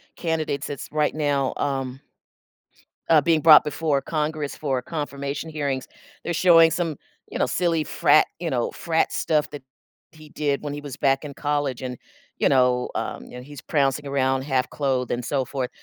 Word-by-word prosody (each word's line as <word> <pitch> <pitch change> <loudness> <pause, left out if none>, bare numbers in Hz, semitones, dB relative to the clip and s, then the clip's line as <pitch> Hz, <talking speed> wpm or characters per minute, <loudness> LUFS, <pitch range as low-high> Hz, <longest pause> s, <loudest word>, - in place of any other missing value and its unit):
candidates 160 -4 -2
that's, 145 -2 -6
right 150 -1 +1
now, 145 -3 0
um, 135 -2 -2 1.1
uh, 160 -2 +7
being 160 +1 +2
brought 155 0 +8
before 150 -1 0
Congress 150 -1 -2
for 135 -4 -2
confirmation 140 +1 -4
hearings. 140 -4 -3 0.4
They're 175 - -2
showing 165 -1 +6
some 165 -5 -2 0.3
you - - -4
know, - - +3
silly 170 -3 +1
frat 155 - +4
you 170 -1 -2
know, 120 -3 0
frat 165 -1 0
stuff 150 -2 0
that 145 -2 -8 0.5
he 155 -1 -15
did 145 -2 -1
when 145 -1 -4
he 145 - -6
was 145 -3 -8
back 135 +1 +2
in 145 -2 -7
college 145 -3 -2
and, 125 -1 -5 0.4
you - - +2
know, 125 -2 +3
um - - -4
and 125 0 -9
he's 145 0 -10
prancing 145 -2 0
around 135 -1 +1
half-clothed, 135 -1 -1
and 120 0 -2
so 135 -3 0
forth. 130 -2 -3
145 Hz, 170 wpm, -24 LUFS, 135-155 Hz, 1.1 s, brought